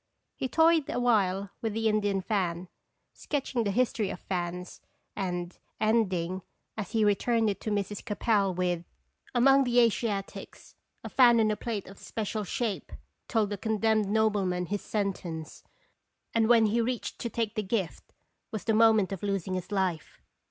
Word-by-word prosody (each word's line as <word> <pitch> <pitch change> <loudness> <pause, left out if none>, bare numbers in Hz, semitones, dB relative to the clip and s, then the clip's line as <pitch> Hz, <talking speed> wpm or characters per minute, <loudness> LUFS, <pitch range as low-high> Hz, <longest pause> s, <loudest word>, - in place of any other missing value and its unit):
He 260 - -2
toyed 320 +2 +3
a - - -1
while 200 -5 +1
with 225 -2 -2
the 225 +1 0
Indian 205 -2 +1
fan, 180 -3 -1 0.4
sketching 270 -4 -2
the - - +1
history 220 -1 +1
of - - -6
fans, 180 -1 -4 0.3
and 180 -2 -3 0.2
ending, 190 -5 +1 0.3
as 210 -2 -5
he 220 -2 +3
returned 220 +2 +2
it 200 - -7
to - - -3
Mrs. 205 -1 -2
Capel, 210 -2 +1
with: 180 -1 -1 0.5
"Among 270 +3 +6
the 245 -1 0
Asiatics 220 -4 -1 0.3
a - - -6
fan 240 -3 +6
on 215 -1 +3
a - - 0
plate 210 -2 -4
of 195 +1 -12
special 215 -1 -3
shape 215 +1 -3 0.4
told 215 -3 +1
a - - -3
condemned 220 -1 +1
nobleman 205 -4 +1
his 205 +3 -3
sentence, 180 -6 -4 0.7
and 225 -1 +2
when 230 -2 +6
he 225 +3 +2
reached 240 +1 -3
to 235 - -3
take 225 -2 -2
the 215 - -1
gift, 195 -3 -3 0.4
was 215 -4 -5
the 225 - +1
mo 225 +1 +7
ment 205 -3 +1
of 195 - -4
losing 195 -2 -2
his 185 +2 -4
life." 185 -5 -2
210 Hz, 165 wpm, -29 LUFS, 190-225 Hz, 0.7 s, mo